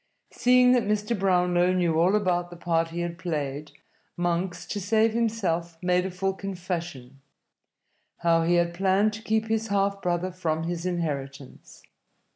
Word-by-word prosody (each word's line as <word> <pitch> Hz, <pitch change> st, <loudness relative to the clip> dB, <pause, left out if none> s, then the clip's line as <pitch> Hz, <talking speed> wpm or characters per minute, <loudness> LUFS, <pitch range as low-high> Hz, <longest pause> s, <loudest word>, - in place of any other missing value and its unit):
Seeing 250 Hz, 0 st, +4 dB
that 250 Hz, -1 st, +4 dB
Mr. 210 Hz, +2 st, 0 dB
Brownlow 180 Hz, -1 st, +2 dB
knew 170 Hz, -3 st, +1 dB
all 180 Hz, +5 st, +4 dB
about 175 Hz, -4 st, 0 dB
the 175 Hz, -, -10 dB
part 165 Hz, -1 st, 0 dB
he 170 Hz, +1 st, -5 dB
had 170 Hz, 0 st, -4 dB
played, 150 Hz, -4 st, -4 dB, 0.5 s
Monks, 175 Hz, 0 st, -1 dB
to 205 Hz, +3 st, -4 dB
save 220 Hz, +3 st, +2 dB
himself, 185 Hz, -8 st, -1 dB
made 180 Hz, +1 st, +2 dB
a -, -, -4 dB
full 190 Hz, +1 st, -2 dB
confession 175 Hz, -9 st, -6 dB, 1.0 s
how 165 Hz, -1 st, +4 dB
he 170 Hz, +2 st, +2 dB
had 170 Hz, 0 st, +1 dB
planned 195 Hz, +4 st, +2 dB
to 220 Hz, -, -7 dB
keep 220 Hz, 0 st, 0 dB
his 225 Hz, 0 st, -1 dB
half 200 Hz, -1 st, 0 dB
brother 180 Hz, +1 st, -1 dB
from 160 Hz, -3 st, -2 dB
his 170 Hz, +1 st, -3 dB
inheritance. 140 Hz, -6 st, -5 dB
180 Hz, 155 wpm, -26 LUFS, 170-200 Hz, 1.0 s, Seeing